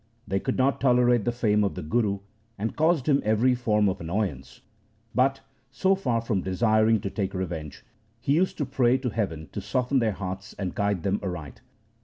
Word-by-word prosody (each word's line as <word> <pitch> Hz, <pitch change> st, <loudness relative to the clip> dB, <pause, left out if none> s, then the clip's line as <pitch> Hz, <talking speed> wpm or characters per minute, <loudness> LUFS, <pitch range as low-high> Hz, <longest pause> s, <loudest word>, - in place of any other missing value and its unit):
They 95 Hz, +1 st, 0 dB
could -, -, -2 dB
not 135 Hz, +1 st, +2 dB
tolerate 125 Hz, -4 st, +4 dB
the 120 Hz, -, +2 dB
fame 105 Hz, -3 st, +2 dB
of 100 Hz, -, -1 dB
the -, -, -5 dB
Guru, 100 Hz, +3 st, 0 dB, 0.4 s
and 110 Hz, +3 st, -3 dB
caused 160 Hz, -3 st, +2 dB
him 140 Hz, -2 st, +4 dB
every 110 Hz, +4 st, +3 dB
form 105 Hz, -4 st, +2 dB
of 95 Hz, -1 st, -2 dB
annoyance, 85 Hz, -6 st, -3 dB, 0.5 s
but, 135 Hz, +2 st, +2 dB, 0.3 s
so 190 Hz, +8 st, +2 dB
far 125 Hz, -12 st, 0 dB
from 110 Hz, -4 st, -1 dB
desiring 110 Hz, +3 st, +3 dB
to 100 Hz, -, -4 dB
take 100 Hz, -1 st, -3 dB
revenge, 85 Hz, -5 st, -5 dB, 0.3 s
he 135 Hz, -, 0 dB
used 180 Hz, +5 st, +1 dB
to 145 Hz, -, -1 dB
pray 130 Hz, -1 st, +2 dB
to 130 Hz, -1 st, -2 dB
heaven 85 Hz, -8 st, -3 dB
to -, -, -5 dB
soften 130 Hz, +2 st, 0 dB
their 110 Hz, -3 st, +1 dB
hearts 95 Hz, 0 st, -6 dB
and 95 Hz, -3 st, -3 dB
guide 100 Hz, -5 st, -1 dB
them 100 Hz, +1 st, 0 dB
aright. 90 Hz, -7 st, -6 dB
110 Hz, 190 wpm, -26 LUFS, 95-125 Hz, 0.5 s, tolerate